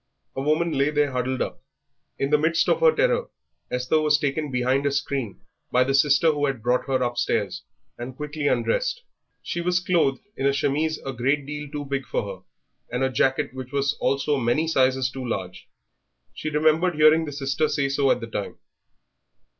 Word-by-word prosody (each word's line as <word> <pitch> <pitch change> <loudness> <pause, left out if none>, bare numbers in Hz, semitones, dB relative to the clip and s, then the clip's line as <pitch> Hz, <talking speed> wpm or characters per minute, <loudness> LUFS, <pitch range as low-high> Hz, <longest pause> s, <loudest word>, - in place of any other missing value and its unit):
A 135 - -2
woman 155 +4 +1
lay 140 0 +2
there 145 -2 +1
huddled 130 0 -1
up. - - -7 0.6
In 135 +1 -1
the 150 - +6
midst 165 +2 +2
of - - +2
her 485 -1 +7
terror - - +1 0.4
Esther 125 +5 +1
was 150 -1 +4
taken 150 +1 -2
behind 130 +2 +1
a - - +1
screen 135 -6 -3 0.3
by 125 +1 +4
the 135 +2 -1
sister 140 +3 +4
who 145 -1 0
had 130 -5 -3
brought 125 +1 +1
her 130 -2 0
upstairs 115 -6 -1 0.4
and 125 +2 -7
quickly 150 0 -3
undressed. - - 0 0.4
She 175 - -3
was 180 +1 +1
clothed 170 -7 +1 0.2
in 135 - 0
a 140 - +3
chemise 150 +3 0
a 135 - -3
great 135 +4 0
deal 150 0 -6
too 145 0 -5
big 135 -1 -3
for - - -1
her, 95 -2 -7 0.5
and 125 +2 -1
a 130 - +1
jacket 130 -1 +1
which 130 -1 -8
was 140 0 +1
also 140 +2 +1
many 125 +7 +1
sizes 130 -4 +2
too 130 0 -6
large. 95 -7 -5 0.6
She 155 - -4
remembered 155 +3 +2
hearing 155 +2 +5
the 150 - -6
sister 140 +2 -1
say 145 -2 0
so 140 0 +1
at 125 - +2
the 115 - -5
time. 105 -3 -5
140 Hz, 190 wpm, -24 LUFS, 130-155 Hz, 0.6 s, her